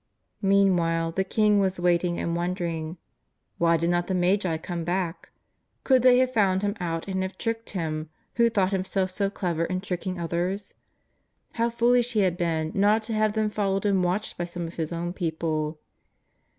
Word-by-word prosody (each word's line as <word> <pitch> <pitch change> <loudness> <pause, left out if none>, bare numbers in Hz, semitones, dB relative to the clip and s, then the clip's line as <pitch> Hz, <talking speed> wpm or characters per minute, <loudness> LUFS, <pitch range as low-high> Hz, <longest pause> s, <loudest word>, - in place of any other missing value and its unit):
Meanw^hile 175 -4 +2
the 190 - +1
king 210 +1 +3
was 190 -2 0
waiting 175 0 +2
and 170 - -1
wondering. 170 -2 -3 0.6
AYhy 170 0 +4
did 170 +2 +1
not 175 0 0
the 190 - -1
Magi 180 -1 +1
come 170 +1 -5
back? 175 0 -2 0.5
Could 260 -2 +4
they 250 0 +6
have 255 0 +2
found 195 -4 +2
him 205 0 0
out 165 -1 -3
and 190 -1 -1
have 190 0 -4
tricked 225 0 -3
him 155 -2 -3 0.3
who 235 -1 +5
thought 200 -4 +1
him 190 -1 0
self 190 -1 -1
so 195 +1 -1
clever 175 -5 -2
in 185 +2 -2
tricking 185 -1 -4
others? 175 +4 -2 0.8
How 230 0 0
foolish 240 +1 +2
he 215 - +3
had 185 -3 +2
been 165 -3 -1
not 210 +3 +3
to 225 +1 -4
have 215 -1 +2
them 215 -1 0
followed 195 -1 -1
and 195 -3 +2
watched 180 +3 -2
by 175 - -1
some 170 0 -5
of 165 - -7
his 160 -1 -3
own 170 +1 -3
people. 160 -3 -2
185 Hz, 185 wpm, -26 LUFS, 170-205 Hz, 0.8 s, they